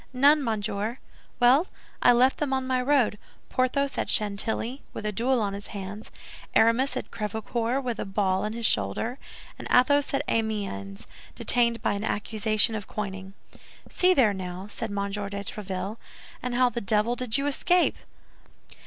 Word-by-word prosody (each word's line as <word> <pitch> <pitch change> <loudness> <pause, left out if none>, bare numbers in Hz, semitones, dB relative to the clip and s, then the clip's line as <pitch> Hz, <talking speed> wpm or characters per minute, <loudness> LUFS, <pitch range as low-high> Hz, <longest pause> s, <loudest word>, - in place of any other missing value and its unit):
"None, 285 +3 +5
monsieur." 215 0 -2 0.4
"Well, 260 +8 +5 0.3
I 245 - +7
left 250 +2 +4
them 285 -3 -1
on 265 -1 0
my 255 -1 +1
road—Porthos 255 +1 0
at - - -1
Chantilly, 220 +5 0
with - - -6
a 210 - 0
duel 245 +5 +1
on 205 -3 -1
his 200 +1 -7
hands; 200 +1 -7 0.5
Aramis 250 +4 +3
at - - -6
Crèvecœur, 225 +4 -2
with 240 -4 -3
a - - -2
ball 195 -1 0
in 215 +1 -2
his 230 0 -3
shoulder; 110 - 0 0.4
and - - -6
Athos 285 +3 +4
at - - 0
Amiens, 200 - -2 0.3
detained 235 -1 +2
by - - +2
an 200 +1 -4
accusation 215 +1 +1
of 210 -3 -5
coining." 195 -2 -6 0.5
"See 365 0 +3
there, 230 -8 +4
now!" 185 0 -6
said 215 +2 -5
M. 200 - -5 0.2
de 205 - -3 0.2
Tréville; 195 +1 -5 0.4
"and 250 0 -3
how 250 0 +4
the 240 -1 -4
devil 215 +3 +1
did 245 -1 -1
you 275 - -1
escape?" 350 +5 +2
225 Hz, 160 wpm, -26 LUFS, 205-255 Hz, 0.5 s, I